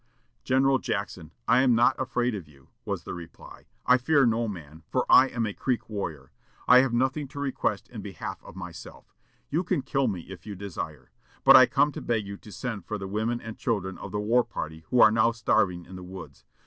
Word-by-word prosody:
"General 135 +1 +3
Jackson, 95 -7 -4 0.2
I 125 - +5
am 125 -3 +4
not 120 +3 +4
afraid 125 -2 0
of 95 -7 -6
you," 70 -3 -21 0.2
was - - -3
the - - -6
reply. 85 -2 -11 0.2
"I 125 +1 +5
fear 140 +1 +3
no 115 0 +1
man, 80 -6 -8
for - - 0
I 130 - +7
am 120 -3 -2
a 105 - -3
Creek 125 +2 -2
warrior. 80 -10 -5 0.4
I 125 +1 +8
have 130 -1 +2
nothing 130 +4 0
to 140 +2 -9
request 140 -2 -2
in - - -8
behalf - - -7
of - - -13
myself. 90 -3 -10 0.4
You 165 +5 +1
can 150 -6 -1
kill 135 -1 0
me, 95 -6 -2
if 95 +1 -11
you 105 -2 -7
desire. 85 -7 -7 0.3
But - - +9
I - - +9
come 150 - +2
to - - -7
beg 115 -3 -1
you 100 0 -6
to 105 - -14
send 110 -4 -5
for 105 - -3
the 95 -1 -6
women 110 +4 -1
and 115 -1 -9
children 100 -7 -2
of - - -8
the 105 - -2
war 115 +4 +3
party, 80 -5 -7
who 125 - +4
are 110 - +8
now 115 +1 +3
starving 90 -6 +1
in 95 +1 -10
the 90 - -9
woods. 95 +1 -11
110 Hz, 220 wpm, -27 LUFS, 95-125 Hz, 0.4 s, But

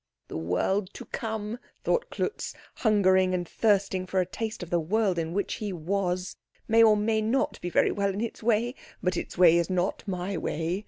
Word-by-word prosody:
"The - - -7
world 135 - 0
to - - -8
come," 220 0 -4 0.2
thought 485 - +1
Klutz, 425 - -3 0.2
hungering 190 -4 +3
and 175 -1 -2
thirsting 195 -3 +1
for 190 +1 0
a 180 - +2
taste 220 +2 -4
of 175 - -10
the 175 - +3
world 190 +2 +1
in 165 0 -2
which 200 +3 -1
he 210 -2 -2
was, 180 +1 -2 0.3
"may 225 0 +5
or 215 -2 +7
may 220 +1 +1
not 230 +5 0
be 175 - -3
very - - +3
well 200 -1 0
in 195 - -4
its 235 - -4
way; 230 +2 +2 0.3
but 180 0 +1
its - - -5
way 170 -2 +7
is 170 +1 +1
not 185 +1 0
my 185 0 -2
way." 165 +5 -2
190 Hz, 200 wpm, -27 LUFS, 180-215 Hz, 0.3 s, or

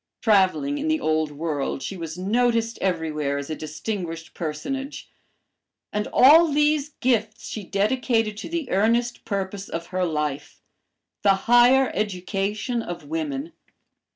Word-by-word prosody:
Traveling 220 +8 +2
in 300 - -2
the 315 0 +2
Old 155 - +1
World 145 -2 -3
she 195 - -4
was 165 -2 -6
noticed 230 +3 +1
everywhere 155 -6 -1
as 140 +2 -5
a - - -2
distinguished 165 +1 -5
personage. 270 - -5 0.8
And 210 0 -1
all 315 +6 +7
these 295 0 +2
gifts 220 -4 0
she 215 - -5
dedicated 215 +2 0
to 220 - -6
the 330 -5 -3
earnest 235 +5 +1
purpose 195 -1 -3
of 165 0 -4
her 185 0 +1
life, 150 -4 -3 0.6
the 200 -1 +5
higher 245 +2 +5
education 205 +4 -2
of 175 -6 -7
women. 150 0 -4
200 Hz, 130 wpm, -24 LUFS, 165-245 Hz, 0.8 s, all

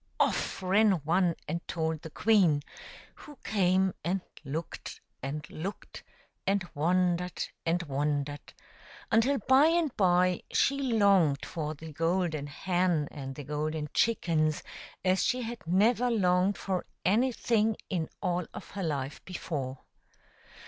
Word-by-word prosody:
Off - - 0
ran 200 +3 +4
one 175 +1 +2
and 170 +3 -2
told 160 -2 -2
the 160 - -8
queen, 175 -7 +3 0.5
who 295 -2 -13
came 190 -2 +2
and 185 +2 0 0.2
looked 155 +4 -5 0.2
and 150 +3 -4
looked, 190 +6 -7 0.4
and 195 -2 +1
wondered 180 +3 +1 0.2
and 175 +2 +1
wondered, 145 0 -2 0.6
until 240 +5 +4
by 265 +6 +5
and 330 -4 +1
by 180 -2 +3
she 275 0 +2
longed 195 -10 +4
for 155 -1 -4
the 155 +1 -10
golden 165 -2 0
hen 175 0 0
and 135 -2 -7
the 145 - -7
golden 150 +2 -2
chickens 160 -9 +1 0.4
as 185 +1 +3
she 250 0 +1
had 235 +1 -5
never 220 +7 +3
longed 190 -3 +2
for 185 -2 -2 0.2
anything 225 0 +2
in 170 -5 -2
all 180 -2 0
of - - -9
her 195 -1 -4
life 145 -3 -3
before. 140 -8 -5
180 Hz, 130 wpm, -29 LUFS, 155-200 Hz, 0.6 s, by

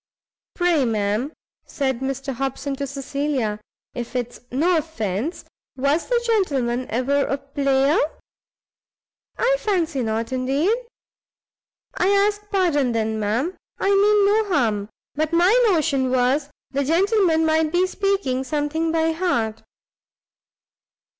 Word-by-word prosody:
"Pray, 350 -5 +2
ma'am," 220 +3 0 0.4
said 265 -4 -1
Mr 270 +1 -3
Hobson, 270 +2 -3
to 280 0 -3
Cecilia, 275 -5 -2 0.3
"if 240 0 -6
it's 245 -1 -3
no 330 +7 +2
offence, 275 - -3 0.3
was 280 +5 0
the 485 -1 +2
Gentleman 270 - 0
ever 255 +5 +1
a 275 - -1
player?" 275 +1 +1 1.4
"I - - +2
fancy 345 - 0
not, 225 0 -2
indeed!" 275 - +1 1.2
"I 365 - +1
ask 410 +1 +1
pardon, 320 - +1
then, 220 -1 -1
ma'am; 230 - -1 0.2
I 390 - 0
mean 405 +1 +4
no 425 +2 +3
harm; 220 - 0 0.2
but 310 +2 -2
my 350 +4 +5 0.2
notion 295 -7 +1
was 260 +3 +1 0.2
the 280 +1 0
gentleman 340 - +2
might 315 -1 +2
be 355 +2 +3
speaking 380 -9 -1
something 305 +3 -1
by 325 0 +1
heart." 235 -11 -1
285 Hz, 120 wpm, -22 LUFS, 255-355 Hz, 1.4 s, my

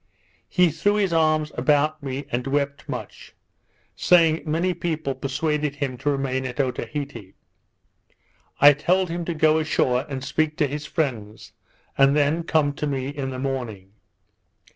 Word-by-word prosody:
He 180 -3 +3
threw 205 +7 +1
his 195 -4 +1
arms 155 -1 +2
about 150 +4 +1
me, 135 0 -5
and 125 +2 -2
wept 140 0 -2
much, - - -7 0.6
saying 165 -3 +4
many 170 +4 0
people 155 -5 -2
persuaded 150 +2 -2
him 140 -3 -3
to 145 - -1
remain 135 -2 -1
at 125 +1 -8
Otaheite. 130 -5 -4 1.2
I 145 +1 +9
told 175 +5 +1
him 170 0 -3
to 170 - -3
go 155 0 +3
ashore 135 -4 0
and 135 -2 -5
speak 150 +3 -1
to 150 - +3
his 145 +2 -5
friends, 115 - -3 0.5
and 135 +1 +5
then 150 +3 +2
come 155 -3 +1
to 150 - -2
me 135 -2 -2
in 140 -2 -4
the 130 - -5
morning. 120 -8 -4
145 Hz, 150 wpm, -23 LUFS, 135-155 Hz, 1.2 s, I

